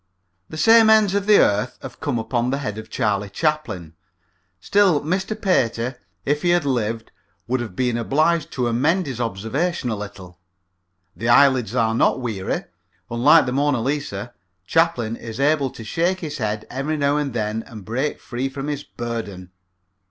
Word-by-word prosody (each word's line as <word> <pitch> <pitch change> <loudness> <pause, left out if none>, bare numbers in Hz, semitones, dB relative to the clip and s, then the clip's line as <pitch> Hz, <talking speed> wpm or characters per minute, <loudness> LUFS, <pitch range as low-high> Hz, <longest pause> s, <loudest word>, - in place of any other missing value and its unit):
The 155 - -7
same 225 +4 +6
ends 215 -3 +5
of 200 0 -1
the 215 - +6
same - - +7
earth 105 +5 0
have - - -9
come 145 -6 -1
upon 120 +1 -1
the 135 - 0
head 110 -7 -4
of 110 0 -10
Charlie 105 -2 -1
Chaplin. 110 - -2 0.7
Still 190 - +3
Mr. 190 +7 -2
Pater, 125 - 0 0.3
if 145 +1 0
he 175 - +1
had 175 -3 +3
lived, 115 -4 -2 0.3
would 125 +2 -1
have 110 -6 -6
been 125 0 0
obliged 155 +6 +1
to 125 -2 0
amend 150 +11 +1
his 125 -3 -4
observation 120 - -2
a - - -1
little. 95 -3 -9 0.8
The 115 +7 -2
eyelids 125 -3 +4
are 115 -2 +2
not 115 - +2
weary. 110 -7 -3 0.5
Unlike 120 +2 +5
the 125 - -2
Mona 140 0 +1
Lisa, 120 -5 -3 0.3
Chaplin 125 - +1
is 115 +1 -8
able 140 -1 +2
to 115 - -10
shake 175 +10 -1
his 155 -2 -5
head 105 0 -2
every 140 +5 -2
now 140 0 +2
and 145 -2 -1
then 110 0 -1
and 110 -6 -10
break 130 +8 -2
free 130 +2 -4
from 135 +2 -5
his 145 -1 -3
burden. 105 -6 -6
125 Hz, 175 wpm, -22 LUFS, 110-150 Hz, 0.8 s, same